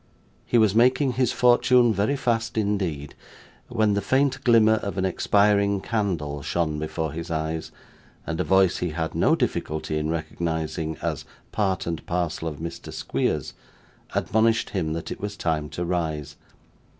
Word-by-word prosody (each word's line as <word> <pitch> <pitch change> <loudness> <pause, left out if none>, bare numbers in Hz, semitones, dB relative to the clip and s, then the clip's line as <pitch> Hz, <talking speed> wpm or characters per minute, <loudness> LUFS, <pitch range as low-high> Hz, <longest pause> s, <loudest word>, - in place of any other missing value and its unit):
He 120 - +3
was 110 -3 +4
making 130 +4 +4
his 125 -1 +1
fortune 125 -1 +4
very 105 +8 +1
fast 115 -4 -1
indeed, 95 -9 -1 0.5
when 110 -3 +1
the 100 - 0
faint 135 +5 +1
glimmer 110 -2 +5
of 100 -2 -5
an 95 - +1
expiring 100 +1 +2
candle 90 -10 -2
shone 75 0 -1
before 80 0 -3
his 85 +3 -6
eyes, 80 0 -3 0.5
and 80 +1 -3
a - - +2
voice 95 -2 +3
he 90 - -2
had 80 -1 -2
no - - +3
difficulty 75 0 -2
in 75 0 -2
recognising 80 -1 -3
as - - -2 0.3
part 95 -4 0
and 85 -2 -3
parcel 85 -2 -2
of 75 -3 -5
Mr 85 +2 -7
Squeers, - - -2 0.6
admonished 110 +2 +2
him 80 -6 -1
that 80 0 -5
it - - -6
was 100 0 -4
time 80 -4 -1
to 85 - -4
rise. 80 -5 -2
95 Hz, 155 wpm, -25 LUFS, 80-110 Hz, 0.6 s, glimmer